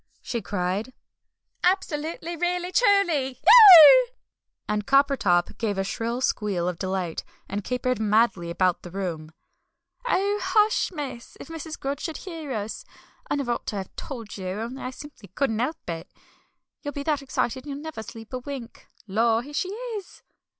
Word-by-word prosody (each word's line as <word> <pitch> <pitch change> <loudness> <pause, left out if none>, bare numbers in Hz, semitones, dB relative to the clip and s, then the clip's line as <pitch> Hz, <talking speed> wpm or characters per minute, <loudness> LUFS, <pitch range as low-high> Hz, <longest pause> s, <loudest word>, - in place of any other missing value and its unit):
she 235 -2 -3
cried, 200 +5 -3 0.7
"absolutely 340 -2 -1
really 355 +1 -1
truly! 350 - +2
Eeeeeuggh!" 415 - +10 0.6
and 210 0 -2
Coppertop 275 -11 +3
gave 210 -4 -1
a 195 - 0
shrill 230 +5 -3
squeal 200 -8 0
of 180 -2 -3
delight, 185 -3 -3 0.2
and 200 +1 -4
capered 250 0 -1
madly 215 -5 +2
about 180 +1 +1
the 175 - -10
room. 170 -4 -5 0.8
"Oh, 405 -1 +1
hush, 430 -2 +2
miss! 280 -8 -7
If - - -10
Mrs. 325 -1 -7
Grudge 275 +1 -3
should 320 - -4
hear 325 -6 -7
us. 215 -2 -4 0.5
I - - +1
never 275 -4 -2
ought 235 - -3
to - - -3
have 190 -2 -6
told 230 -8 -7
you, 190 -2 -6
only 225 +8 -5
I 255 - -4
simply 260 -5 -12
couldn't 230 -5 0
'elp 310 +6 -3
it. 165 -1 -6 0.7
You'll 290 -2 -5
be 285 - -5
that 295 -1 0
excited 260 0 -2
you'll 280 -1 -5
never 300 -5 -7
sleep 225 +2 -11
a 255 - -2
wink. 255 -3 -9 0.2
Lor, 225 +3 +1
here 290 +3 -11
she 365 +5 -1
is!" 435 -2 -7
255 Hz, 160 wpm, -25 LUFS, 210-320 Hz, 0.8 s, Eeeeeuggh